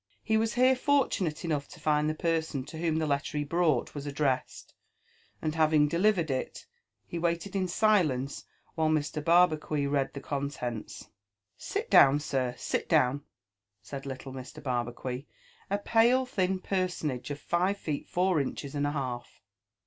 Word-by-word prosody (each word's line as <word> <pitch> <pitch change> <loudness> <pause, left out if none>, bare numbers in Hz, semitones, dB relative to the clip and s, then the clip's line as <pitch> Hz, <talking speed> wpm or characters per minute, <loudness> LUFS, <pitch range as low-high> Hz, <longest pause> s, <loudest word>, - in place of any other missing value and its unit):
He 220 - +1
was 225 +1 +1
here 255 +1 +5
fortunate 245 - +1
enough 150 -4 -1
to - - -13
find 150 0 +2
the 155 - -2
person 160 -5 -1
to 160 - -8
whom 165 -2 0
the 160 - 0
letter 145 +1 -1
he 145 - 0
brought 155 -3 +1
was 145 0 -6
addressed; 140 -2 -2 0.7
and 155 - 0
having 155 -2 +4
delivered 170 -1 +2
it, 130 - -4 0.4
he 170 - -5
wailed 170 +1 0
in 190 -1 +1
silence 170 - +1 0.3
while 160 -1 +1
Mr. 150 -1 -1
Barbacuit 155 -4 +3
read 140 -1 0
the - - -4
contents. 135 -5 -5 0.2
" 105 0 -59
Sit - - -4
down, 140 +1 +7
sir, 130 -4 -1
sit - - -2
down," 130 +3 +3 0.6
said 135 +6 -7
liltle 135 0 -6
Mr. 130 +3 -9
Barbacuit, 125 0 -3 0.4
a 200 - +1
pale 235 +5 +3
thin 190 -7 0
personable 180 -9 -2
of 145 - -9
five 180 +5 0
feet 150 -6 -4
four 180 -3 +2
inches 140 +1 -5
and 145 0 0
a - - -1
half. 125 -4 -5
150 Hz, 160 wpm, -29 LUFS, 140-175 Hz, 0.7 s, down